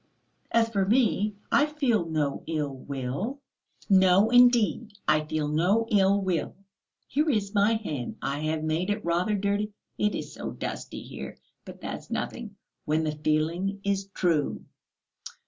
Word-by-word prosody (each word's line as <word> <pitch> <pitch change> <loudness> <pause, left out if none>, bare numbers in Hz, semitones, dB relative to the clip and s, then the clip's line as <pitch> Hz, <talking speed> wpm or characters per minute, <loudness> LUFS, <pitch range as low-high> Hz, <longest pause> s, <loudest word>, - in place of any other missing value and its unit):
As 230 -1 +4
for 205 -4 0
me, 210 -1 +2 0.2
I 290 - +4
feel 255 - +1
no 150 -3 -1
ill 150 -4 -2
will; 140 - -4 0.5
no, 190 +2 +5
indeed, 240 -2 +4
I 155 0 +4
feel 155 -1 -2
no 180 +9 +2
ill 200 -1 +4
will, 180 -5 -1 0.5
here 300 +4 +1
is 210 -6 0
my 205 +2 +4
hand. 150 - -4
I 140 +1 -2
have 155 +1 -1
made 160 +4 -1
it 205 -1 -2
rather 175 +5 +1
dirty, 205 +1 -1 0.3
it 210 0 +1
is - - -5
so - - -6
dusty - - -6
here; - - -8 0.3
but - - -11
that's - - -6
nothing, 220 -4 -4 0.3
when 155 +1 +1
the 155 - 0
feeling 165 +6 0
is 195 -1 -1
true." 170 -6 0
195 Hz, 145 wpm, -27 LUFS, 155-215 Hz, 0.5 s, no